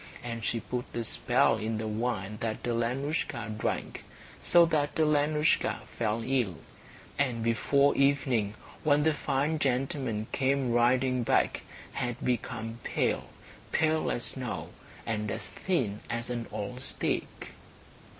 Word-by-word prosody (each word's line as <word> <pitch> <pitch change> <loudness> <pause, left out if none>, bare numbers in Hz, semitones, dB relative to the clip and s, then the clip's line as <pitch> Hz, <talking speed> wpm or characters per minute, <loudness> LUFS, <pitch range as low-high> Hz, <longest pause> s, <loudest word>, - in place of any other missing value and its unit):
And 115 -1 -4
she 115 - 0
put 125 -1 -3
a 120 - -1
spell - - +3
in 110 +1 -2
the 110 0 -3
wine 105 -2 -2
that 110 -1 -2
Alenoushka 120 -1 -1
drank, 110 - -3 0.4
so 175 -1 +6
that 150 -3 0
Alenoushka 150 0 +2
fell 115 0 0
ill, 125 -10 +1 0.6
and 125 -5 +1
before 140 +5 +3
evening, 130 -7 +2 0.3
when 145 -1 +4
the 160 0 +4
fine 145 +2 0
gentleman 130 -4 0
came 135 -1 +1
riding 125 +2 +3
back, 115 - +2 0.3
had 120 -1 -2
become 115 -2 -2
pale, - - 0 0.4
pale 160 0 +2
as 120 - -1
snow, 130 -3 -3 0.4
and 105 -1 -1
as - - -3
thin 125 - -1
as 115 +1 -3
an 120 -1 -3
old 110 +4 -5
stick. - - -2
125 Hz, 130 wpm, -30 LUFS, 115-140 Hz, 0.6 s, so